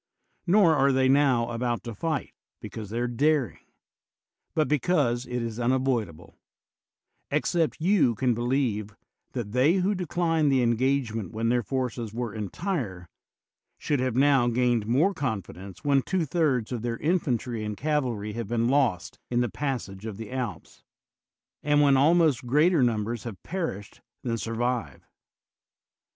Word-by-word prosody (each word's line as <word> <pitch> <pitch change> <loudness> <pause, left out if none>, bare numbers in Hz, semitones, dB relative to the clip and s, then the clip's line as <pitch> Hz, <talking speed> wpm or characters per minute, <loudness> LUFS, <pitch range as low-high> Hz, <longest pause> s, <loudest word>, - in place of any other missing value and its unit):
Nor 175 -3 +5
are 140 -1 +3
they 130 0 +3
now 130 -4 +3
about 120 0 -2
to 115 - -6
fight 155 +6 -3 0.3
because 110 -3 -8
they 115 - -4
are 120 - 0
daring, 140 0 +1 1.0
but 155 -1 +2
because 140 -5 +1
it 125 -1 -3
is 115 0 -5
unavoidable; 120 -9 -1 0.9
except 165 -3 0
you 160 - +3
can 125 +3 +1
be 120 - -4
lieve 120 -5 -1 0.4
that 115 -5 -4
they 130 +7 +4
who 190 +2 +1
declined 165 -4 0
the 130 -2 +3
engagement 115 -4 0
when 115 +1 -1
their 120 0 +2
forces 120 -3 -3
were 120 -3 -3
entire 110 - -4 0.7
should 145 -3 -1
have 130 -2 -1
now 135 -2 +4
gained 120 -2 +1
more 150 - +3
confidence 100 - -5
when 140 -1 +3
two 180 +3 -1
thirds 135 -8 0
of 120 -3 -3
their 120 0 -2
infantry 125 - -1
and 105 -1 -4
cavalry 125 -7 -1
have 115 -1 -4
been 115 +1 0
lost 130 - 0
in 120 0 +1
the 120 - 0
pas 135 0 -2
sage 95 +2 -9
of 105 -3 -6
the 110 0 -8
Alps, 125 -5 -5 0.8
and 145 0 +2
when 140 -2 +5
almost 150 -3 +3
greater 150 +5 +4
num 115 -4 +2
bers 115 0 -4
have 110 -5 -6
perished 160 - -5 0.2
than 115 -2 -1
survive. 115 - -3
125 Hz, 150 wpm, -26 LUFS, 115-145 Hz, 1.0 s, Nor